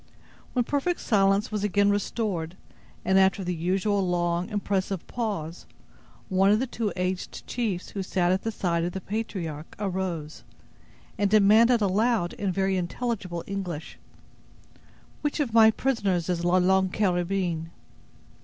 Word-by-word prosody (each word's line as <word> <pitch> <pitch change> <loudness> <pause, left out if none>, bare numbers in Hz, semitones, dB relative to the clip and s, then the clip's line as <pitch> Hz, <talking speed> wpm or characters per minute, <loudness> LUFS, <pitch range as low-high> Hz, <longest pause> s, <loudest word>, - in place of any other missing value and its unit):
When 245 -2 +1
perfect 295 +7 0
silence 200 0 +2
was 210 -1 -2
again 205 0 +3
restored, 195 -4 -2 0.5
and 190 0 +4
after 190 0 +3
the 180 0 -2
usual 190 +4 0
long, 175 0 0
impressive 195 -3 -2
pause, 200 -9 -4 0.6
one 190 +1 +3
of 210 +1 +4
the 260 - 0
two 230 -4 -3
aged 185 0 -3
chiefs 215 -7 -3
who 200 - -4
sat 180 -1 +1
at 190 +1 +1
the 225 - -2
side 170 -5 -1
of 175 +1 -2
the 190 - -3
patriarch 175 -8 -5
arose, 185 -6 -3 0.8
and 205 -1 +2
demanded 215 +3 +5
aloud, 205 -1 +1
in 200 -2 -2
very 190 +1 0
intelligible 185 -1 -3
English: 180 -6 -5 1.2
"Which 295 +1 -1
of 265 -7 -1
my 225 -1 +8
prisoners 205 -8 0
is 175 -1 -1
La 175 +1 +3
Longue 190 +1 +3
Carabine?" 180 -4 0
195 Hz, 140 wpm, -26 LUFS, 180-210 Hz, 1.2 s, my